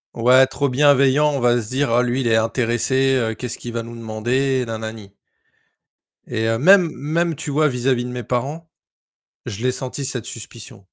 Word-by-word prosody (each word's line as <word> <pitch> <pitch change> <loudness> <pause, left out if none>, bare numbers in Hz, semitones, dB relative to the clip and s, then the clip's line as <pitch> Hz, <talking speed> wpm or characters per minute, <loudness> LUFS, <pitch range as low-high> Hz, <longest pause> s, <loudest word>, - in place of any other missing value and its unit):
Ouais, 125 +3 +5
trop 140 -1 -1
bienveillant, 140 +2 +4
on 140 - -2
va 120 0 +3
se 105 - -8
dire: 135 +1 0
«Ah 120 +1 +3
lui 125 +2 -1
il 120 - -1
est 110 - +3
intéressé, 120 +4 +1
heu, 115 -3 0
qu'est-ce 125 0 -5
qu'il 120 -1 -7
va 115 - -2
nous 115 0 -10
demander? 120 +4 -1
Na, 110 -1 -4
na, 110 0 -5
ni.» 100 -3 -13 1.2
Et 110 0 -2
heu, 115 0 +1
même 180 +4 +5
même, 160 +3 -1
tu 145 - -5
vois, 155 +2 +3
vis-à-vis 125 -1 0
de - - -5
mes 125 -1 -5
parents, 140 +8 -3 0.8
je 105 +4 -6
l'ai 130 0 +1
sentie, 130 +2 -5
cette 125 -4 -4
suspicion. 115 -2 -8
125 Hz, 200 wpm, -20 LUFS, 115-140 Hz, 1.2 s, Ouais